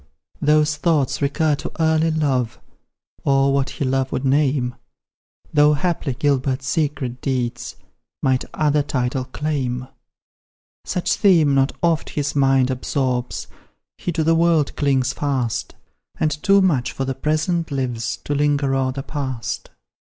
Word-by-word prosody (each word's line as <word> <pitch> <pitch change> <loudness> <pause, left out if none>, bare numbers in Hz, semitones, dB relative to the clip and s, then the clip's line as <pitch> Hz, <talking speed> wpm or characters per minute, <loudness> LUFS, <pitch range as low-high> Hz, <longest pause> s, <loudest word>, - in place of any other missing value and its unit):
Those 150 +1 +3
thoughts 150 -5 +1
recur 150 +2 +1
to - - -6
early 160 0 +3
love, 140 -7 0 0.6
Or 135 0 +3
what 140 -1 +1
he 140 - -3
love 130 0 0
would 130 - -2
name, 135 -2 +2 0.8
Though 150 0 +5
haply 155 -4 -1
Gilbert's 135 -1 0
secret 140 -6 -1
deeds 125 -3 -2 0.5
Might 130 -1 +2
other 150 -1 +2
title 130 -2 -1
claim. 130 -3 -3 1.0
Such 180 - 0
theme 165 -8 +4
not 135 0 +2
oft 165 -2 +1
his 145 -1 -2
mind 135 -2 +3
absorbs, 130 -1 -2 0.5
He 175 - -3
to 160 - 0
the 165 +1 +3
world 165 -3 +2
clings 135 -2 +1
fast, 125 -5 -2 0.4
And 155 - +2
too 195 +7 +3
much 145 -10 +1
for 135 - -3
the 135 - -2
present 155 +5 -1
lives, 125 -4 -2
To 145 - -2
linger 145 -1 +1
o'er 135 -1 +1
the 135 +1 -5
past. 130 -6 -4
140 Hz, 135 wpm, -21 LUFS, 130-155 Hz, 1.0 s, Though